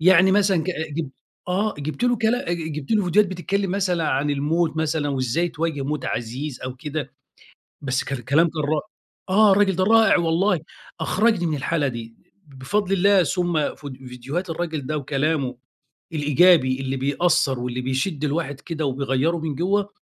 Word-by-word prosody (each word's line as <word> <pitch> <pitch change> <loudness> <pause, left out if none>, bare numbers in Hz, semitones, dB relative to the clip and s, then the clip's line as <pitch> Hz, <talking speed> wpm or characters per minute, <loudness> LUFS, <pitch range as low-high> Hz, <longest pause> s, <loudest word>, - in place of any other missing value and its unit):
يعني 185 +2 +6
مثلًا 195 -4 +3
ك 185 - -1 0.2
ج 155 -1 -3 0.4
آه، 205 +4 0
جِيبت 155 +12 -3
له 245 -1 +3
كلا 225 -2 0
أ - - +1
ج 160 -2 -5
جِيبت 145 -2 -7
له 210 -3 +3
فيديوهات 190 +2 +3
بتتكلّم 190 +2 -2
مثلًا 180 -4 0
عن 140 +3 0
الموت 155 +3 0
مثلًا 160 -2 0
وإزاي 135 +5 0
تواجه 160 -3 -3
موت 145 0 -3
عزيز 125 +4 -4
أو 130 0 -5
كده، 145 -2 -5 0.7
بس 130 -2 -1
كان 135 -2 -3
كلام 160 +6 +3
كان 155 -1 -4
را 150 +1 +1 0.5
آه، 210 +1 +6
الراجل 195 -2 +3
ده 185 - +2
رائع 225 0 +5
والله، 170 +1 +1 0.4
أخرَجني 190 +2 +2
من 155 -2 -1
الحالة 145 +1 0
دي، 115 -2 -7 0.3
ب 135 -2 -16
بفضْل 200 +7 -1
الله 195 0 +4
ثُم 175 -3 0
ف 145 - -12
فيديوهات 130 +6 -6
الراجل 160 -4 -3
ده 155 0 -1
وكلامه 140 -2 -1 0.6
الإيجابي 150 -3 +4
اللي 135 0 -2
بيأثّر 140 -1 +1
واللي 125 0 -3
بيشد 135 +5 -2
الواحد 145 -2 -2
كده 160 -3 -4
وبيغيّره 135 +4 0
من 155 -3 -3
جوَّه، 195 +5 0
155 Hz, 170 wpm, -23 LUFS, 140-180 Hz, 0.7 s, يعني